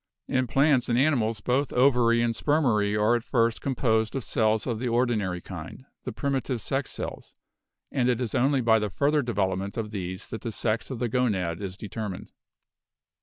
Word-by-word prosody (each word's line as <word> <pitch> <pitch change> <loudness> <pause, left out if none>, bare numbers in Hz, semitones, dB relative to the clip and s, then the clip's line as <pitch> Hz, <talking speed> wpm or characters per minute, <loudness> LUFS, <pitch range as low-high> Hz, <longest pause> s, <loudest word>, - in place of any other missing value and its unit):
In 130 -1 0
plants 135 -1 +3
and 120 - +2
animals 120 -6 +2
both 130 +5 0
ovary 120 -2 +4
and 115 -1 +1
spermary 110 -10 +1
are 110 +3 +4
at 120 - -2
first 115 -2 +1
composed 110 -4 0
of 135 - -2
cells 110 -1 +1
of 115 -4 -2
the 125 - -2
ordinary 115 -7 0
kind, 85 - -9 0.2
the - - -3
primitive 135 -3 -2
sex 135 +5 -2
cells, - - -6 0.6
and 125 -3 +1
it 120 -2 +1
is 120 -4 -3
only 135 +2 +2
by 110 -1 +4
the 105 -1 -2
further 145 +8 +1
development 100 -5 -2
of 110 -2 -3
these 95 -3 -5
that 110 - -6
the 115 - -4
sex 110 +1 -2
of 130 - -4
the 120 +1 -1
gonad 105 -8 0
is 95 -2 -5
determined. 105 -2 -6
115 Hz, 180 wpm, -26 LUFS, 105-130 Hz, 0.6 s, ovary